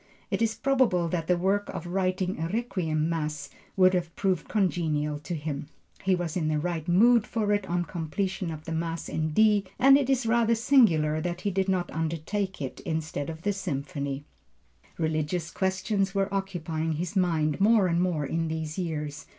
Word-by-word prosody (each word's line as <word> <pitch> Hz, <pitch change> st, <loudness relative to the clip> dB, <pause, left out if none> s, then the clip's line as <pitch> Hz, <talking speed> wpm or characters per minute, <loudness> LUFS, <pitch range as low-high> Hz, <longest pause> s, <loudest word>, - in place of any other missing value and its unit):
It -, -, 0 dB
is 225 Hz, -1 st, +1 dB
probable 250 Hz, -11 st, +2 dB
that 165 Hz, -1 st, -2 dB
the 180 Hz, -, +3 dB
work 195 Hz, +3 st, 0 dB
of -, -, -5 dB
writing 185 Hz, 0 st, -1 dB
a 165 Hz, -, -1 dB
Requiem 180 Hz, -8 st, -1 dB
Mass 150 Hz, -3 st, -3 dB, 0.3 s
would 185 Hz, 0 st, +6 dB
have 170 Hz, -2 st, -1 dB
proved 185 Hz, -5 st, 0 dB
congenial 155 Hz, -7 st, 0 dB
to 170 Hz, +4 st, -5 dB
him. 145 Hz, -2 st, -4 dB, 0.3 s
He 185 Hz, 0 st, +2 dB
was 175 Hz, -3 st, -3 dB
in 165 Hz, -4 st, 0 dB
the 155 Hz, 0 st, +1 dB
right 165 Hz, +1 st, -2 dB
mood 225 Hz, +6 st, +5 dB
for 210 Hz, -2 st, 0 dB
it 205 Hz, -2 st, -1 dB
on 175 Hz, 0 st, 0 dB
completion 185 Hz, +3 st, -3 dB
of 155 Hz, -1 st, -6 dB
the -, -, -5 dB
Mass 165 Hz, 0 st, -3 dB
in 155 Hz, 0 st, -1 dB
D, 210 Hz, +4 st, +4 dB
and 275 Hz, +2 st, +7 dB
it 270 Hz, -2 st, -1 dB
is 265 Hz, -2 st, +2 dB
rather 230 Hz, 0 st, +3 dB
singular 175 Hz, -, +4 dB
that 175 Hz, +1 st, -3 dB
he 205 Hz, -, -1 dB
did 190 Hz, +1 st, 0 dB
not 180 Hz, -2 st, 0 dB
undertake 165 Hz, +3 st, -2 dB
it 130 Hz, -, -6 dB
instead 160 Hz, -2 st, -3 dB
of 160 Hz, 0 st, -8 dB
the 205 Hz, -, +1 dB
Symphony. 140 Hz, -5 st, -4 dB, 0.7 s
Religious 160 Hz, +1 st, -1 dB
questions 195 Hz, +1 st, 0 dB
were 195 Hz, 0 st, 0 dB
occupying 165 Hz, -5 st, -2 dB
his 170 Hz, +5 st, -4 dB
mind 165 Hz, -3 st, +1 dB
more 215 Hz, -1 st, +5 dB
and 170 Hz, -1 st, +1 dB
more 170 Hz, -5 st, 0 dB
in 165 Hz, +3 st, -1 dB
these 160 Hz, +1 st, -4 dB
years. 150 Hz, -4 st, -4 dB
175 Hz, 185 wpm, -27 LUFS, 155-195 Hz, 0.7 s, and